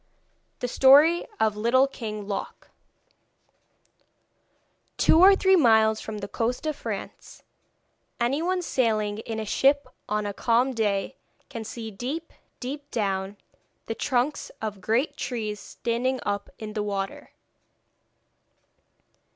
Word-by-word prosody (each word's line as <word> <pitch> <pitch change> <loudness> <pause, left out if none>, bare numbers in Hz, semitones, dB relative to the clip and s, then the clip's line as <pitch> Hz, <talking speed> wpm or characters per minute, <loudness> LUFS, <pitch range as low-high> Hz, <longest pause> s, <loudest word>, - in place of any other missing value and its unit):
THE 245 - -1
STORY 290 +7 +6
OF 215 -1 +2
LITTLE 240 +5 +3
KING 215 -5 -6
LOC 200 - -6 2.3
Two 320 - +5
or 390 +2 +8
three 380 0 +4
miles 220 -7 +4
from 220 -1 -6
the 200 -1 -5
coast 235 +7 -2
of 310 -1 -1
France, - - -7 0.8
anyone 330 +10 0
sailing 215 -7 0
in 220 0 -5
a 220 - -3
ship 280 +6 +3 0.2
on 210 0 0
a 205 - -3
calm 240 +5 +2
day 205 -4 -1 0.3
can 230 -4 -6
see 225 0 -7
deep, 275 +11 -5 0.3
deep 285 +3 -6
down, 195 -3 -2 0.5
the 225 - -3
trunks 255 +5 -1
of 210 -3 -5
great 255 +9 0
trees 220 -7 -3
standing 245 +5 -2
up 205 0 -2
in 215 -1 -7
the 210 - -2
water. 200 -1 -4
230 Hz, 120 wpm, -26 LUFS, 210-270 Hz, 2.3 s, or